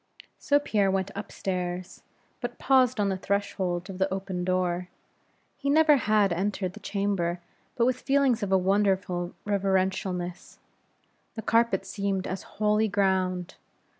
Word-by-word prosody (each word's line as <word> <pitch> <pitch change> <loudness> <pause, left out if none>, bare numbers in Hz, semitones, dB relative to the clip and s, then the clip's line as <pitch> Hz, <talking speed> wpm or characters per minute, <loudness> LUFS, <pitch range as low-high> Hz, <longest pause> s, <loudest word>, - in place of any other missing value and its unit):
So 285 - +3
Pierre 210 -9 +1
went 190 0 -1
up 200 - -6
stairs, 180 -1 -4 0.4
but 240 -1 -5
paused 255 -3 +3
on 200 -1 +2
the 190 - -1
threshold 190 -2 -2
of 190 -2 -8
the 190 0 +1
open 190 -2 -3
door. 180 -1 0 0.7
He 280 - -2
never 305 0 +6
had 210 -5 +2
entered 190 0 -2
that - - -12
chamber 195 -4 -1 0.4
but 235 - +2
with 255 0 0
feelings 270 -4 +2
of 200 -2 -2
a 190 - +5
wonderful 190 -2 +1
reverentialness. 190 -3 -1 0.8
The 220 - -5
carpet 225 -4 +2
seemed 195 -1 -2
as 185 - -4 0.2
holy 210 +1 +2
ground. 190 -3 0
195 Hz, 140 wpm, -27 LUFS, 185-215 Hz, 0.8 s, never